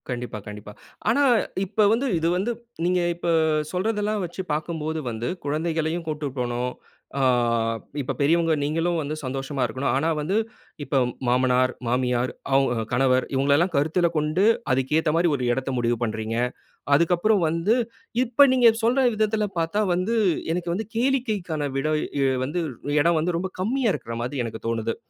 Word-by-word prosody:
கண்டிப்பா, 125 -3 -4
கண்டிப்பா. 105 0 -8 0.4
ஆனா 280 +6 +3 0.4
இப்போ 215 +3 +1
வந்து 255 +5 0
இது 165 - 0
வந்து, 200 +6 -1 0.3
நீங்க 180 0 +2
இப்ப 175 - -5 0.5
சொல்றதல்லாம் 210 +1 -1
வச்சு 175 +2 -6
பாக்கும்போது 160 0 -3
வந்து, 115 +2 -4 0.2
குழந்தைகளையும் 160 +2 -1
கூட்டு 150 -1 -3
போணும். 125 0 -2 0.5
ஆ - - +1 0.8
இப்ப 130 - -3
பெரியவங்க 165 +3 +3
நீங்களும் 165 +4 0
வந்து 150 0 -3
சந்தோஷமா 135 +1 -4
இருக்கணும். 125 +2 -1
ஆனா, 155 +5 +1
வந்து 160 +7 -1 0.5
இப்ப 140 -1 +1 0.3
மாமனார், 125 +1 +3 0.2
மாமியார், 125 0 0 0.2
அவுங்க 125 -4 +2
கணவர் 130 +1 +2
இவுங்களல்லாம் 140 +7 +2
கருத்தில 160 +4 +2
கொண்டு, 155 +5 +1 0.3
அதுக்கு 135 +3 +1
ஏத்த 160 -1 +1
மாரி 170 +1 +3
ஒரு 130 - -3
எடத்தை 135 +2 -2
முடிவு 120 0 +1
பண்றீங்க. 110 0 -3 0.6
அதுக்கு 170 +4 +3
அப்புறம் 210 +2 +2
வந்து, 165 +8 +1 0.5
இப்ப 255 +3 +5
நீங்க 245 -2 +6
சொல்ற 255 +3 +3
விதத்தில 215 0 +1
பாத்தா 165 +6 0
வந்து, 185 +6 0 0.4
எனக்கு 175 0 -2
வந்து 215 +5 -3
கேளிக்கைக்கான 215 - 0
விடை 155 +3 0 0.5
வந்து, 150 +7 -2 0.4
எடம் 170 +1 +3
வந்து 170 +2 0
ரொம்ப 185 +2 -3
கம்மியா 230 +4 +1
இருக்கிற 115 -5 -5
மாதி 125 0 -2
எனக்கு 110 -1 -7
தோணுது. 115 0 -1
155 Hz, 150 wpm, -24 LUFS, 130-180 Hz, 0.8 s, நீங்க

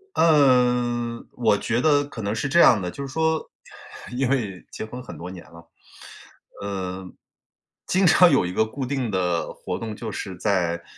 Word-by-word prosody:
嗯， 125 -6 +3
我 110 -4 +2
觉 120 +2 -1
得 145 -1 +3
可 135 -6 -8
能 100 +1 -2
是 125 +5 -2
这 170 +5 +4
样 115 - +6
的， 90 -1 -3
就 140 +9 -6
是 130 - -10
说， 160 0 0 0.7
因 130 -1 +1
为 105 -9 -2
结 - - -6
婚 125 +3 -8
很 - - -10
多 90 +2 -7
年 90 -2 -10
了。 85 0 -16 0.9
呃， 95 -2 -4 0.8
经 190 0 +2
常 175 +1 +6
有 90 - +3
一 90 - -4
个 110 - +2
固 130 +4 -5
定 130 -3 -2
的 90 -3 -1
活 - - -5
动 110 -1 -5
就 115 -2 -6
是 95 -3 -6
在 85 -3 0
115 Hz, 190 characters per minute, -23 LUFS, 95-135 Hz, 0.9 s, 样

